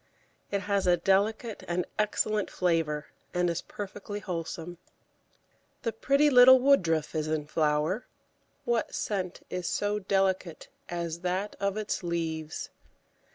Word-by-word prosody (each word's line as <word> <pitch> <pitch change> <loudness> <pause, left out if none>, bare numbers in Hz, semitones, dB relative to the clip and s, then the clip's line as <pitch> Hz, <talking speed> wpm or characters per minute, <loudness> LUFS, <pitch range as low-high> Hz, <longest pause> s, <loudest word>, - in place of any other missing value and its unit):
It 200 -1 -1
has 200 -1 0
a 175 0 +5
delicate 205 +5 +1
and 175 +1 -1
excellent 215 0 +1
flavour, 165 -4 0 0.2
and 175 -1 +2
is 170 - -3
perfectly 205 0 -7
wholesome. 170 -2 -5 1.0
The 230 - 0
pretty 280 +6 +3
little 255 0 +9
Woodruff 170 - +3
is 155 -1 -1
in 155 -1 -1
flower; 150 +7 0 0.6
what 235 -1 0
scent 190 -4 -3
is 180 -2 -3
so 205 0 0
delicate 190 -4 0 0.2
as 170 -1 -3
that 185 +3 -2
of 200 +1 -1
its 215 -1 -2
leaves? 160 -3 -3
185 Hz, 125 wpm, -29 LUFS, 165-210 Hz, 1.0 s, little